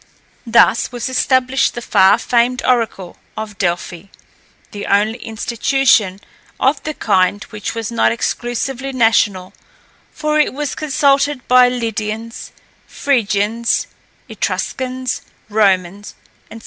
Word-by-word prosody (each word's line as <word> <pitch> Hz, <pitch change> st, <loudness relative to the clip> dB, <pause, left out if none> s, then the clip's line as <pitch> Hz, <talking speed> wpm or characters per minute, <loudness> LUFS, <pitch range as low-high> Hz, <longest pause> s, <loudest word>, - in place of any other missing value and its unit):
Thus 230 Hz, 0 st, +4 dB
was 245 Hz, 0 st, -4 dB
established 260 Hz, 0 st, +1 dB
the 240 Hz, -, -5 dB
far 195 Hz, 0 st, +4 dB
famed 240 Hz, +1 st, +1 dB
oracle 225 Hz, -7 st, -1 dB, 0.2 s
of 215 Hz, -3 st, -7 dB
Delphi, 175 Hz, 0 st, -2 dB, 0.7 s
the 205 Hz, -1 st, -6 dB
only 210 Hz, +3 st, +1 dB
institution 230 Hz, -2 st, +1 dB, 0.4 s
of 275 Hz, +2 st, +1 dB
the 305 Hz, -1 st, -5 dB
kind 200 Hz, 0 st, +1 dB
which 210 Hz, +1 st, -5 dB
was 230 Hz, 0 st, -4 dB
not 230 Hz, -, +2 dB
exclusively 245 Hz, +3 st, -3 dB
national, 210 Hz, -6 st, +1 dB, 0.6 s
for 305 Hz, 0 st, -1 dB
it 300 Hz, -, +1 dB
was 290 Hz, -1 st, -3 dB
consulted 285 Hz, -2 st, +1 dB
by 250 Hz, 0 st, +6 dB
Lydians, 225 Hz, -1 st, -4 dB, 0.4 s
Phrygians, 230 Hz, -3 st, 0 dB, 0.4 s
Etruscans, 255 Hz, -1 st, -3 dB, 0.3 s
Romans, 200 Hz, -2 st, 0 dB, 0.4 s
&c. 225 Hz, -, -9 dB
230 Hz, 110 wpm, -17 LUFS, 205-255 Hz, 0.7 s, by